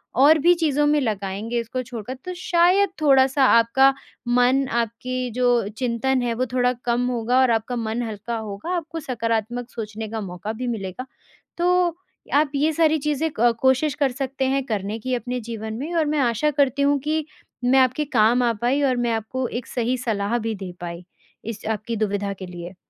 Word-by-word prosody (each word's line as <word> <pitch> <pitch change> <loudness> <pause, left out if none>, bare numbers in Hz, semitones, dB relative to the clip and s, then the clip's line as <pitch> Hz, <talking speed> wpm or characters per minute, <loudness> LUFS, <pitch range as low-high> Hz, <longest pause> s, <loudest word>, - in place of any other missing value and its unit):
और 285 +6 +6
भी 345 +5 +5
चीज़ों 295 -3 +1
में 300 0 +3
लगाएँगे 210 0 -2
इसको 235 +2 -3
छोड़ 235 -3 -7
कर। 250 +5 -5
तो 365 - -4
शायद 360 +3 +3
थोड़ा-सा 270 -1 +4
आपका 260 +4 +5 0.3
मन 250 +2 +3
आपकी 235 +2 -2
जो 245 -2 +2
चिंतन 255 +1 0
है 240 -1 0
वो 255 +2 0
थोड़ा 250 -1 +3
कम 240 +1 +1
होगा 245 +1 +1
और 260 -2 +4
आपका 225 +2 -1
मन 225 0 -2
हल्का 220 +1 -5
होगा 215 - -4
आपको 325 0 -5
सकारात्मक 235 -2 -2
सोचने 220 -1 -6
का 220 0 -4
मौका 185 +2 -5
भी 250 +3 -4
मिलेगा। 215 0 -4 0.5
तो, 355 -1 +2 0.4
आप 290 0 +3
ये 300 +3 +2
सारी 315 0 +3
चीज़ें 300 +2 -1
क 240 +1 +5
कोशिश 265 +3 +3
कर 280 -3 +1
सकते 270 +1 -3
हैं 275 0 +1
करने 210 -2 -3
की 255 +3 -3
अपने 250 +1 -3
जीवन 220 -1 -6
में 310 +6 -4
और 325 -2 +2
मैं 300 0 0
आशा 245 +3 +2
करती 280 -1 +1
हूँ 285 0 +3
कि 305 +2 -1 0.4
मैं 260 +2 +5
आपके 260 +3 +2
काम 230 +4 +4
आ 240 - +3
पाई 255 +4 +2
और 260 -3 +2
मैं 235 - +1
आपको 225 +4 -2
एक 245 - -13
सही 245 +1 -1
सलाह 225 -2 -1
भी 225 -1 -3
दे 190 -2 -7
पाई, 170 0 -6 0.4
इस 225 -1 -6
आपकी 220 +2 -3
दुविधा 205 -1 -1
के 190 -1 -8
लिए। 175 +1 -8
245 Hz, 190 wpm, -23 LUFS, 225-275 Hz, 0.5 s, और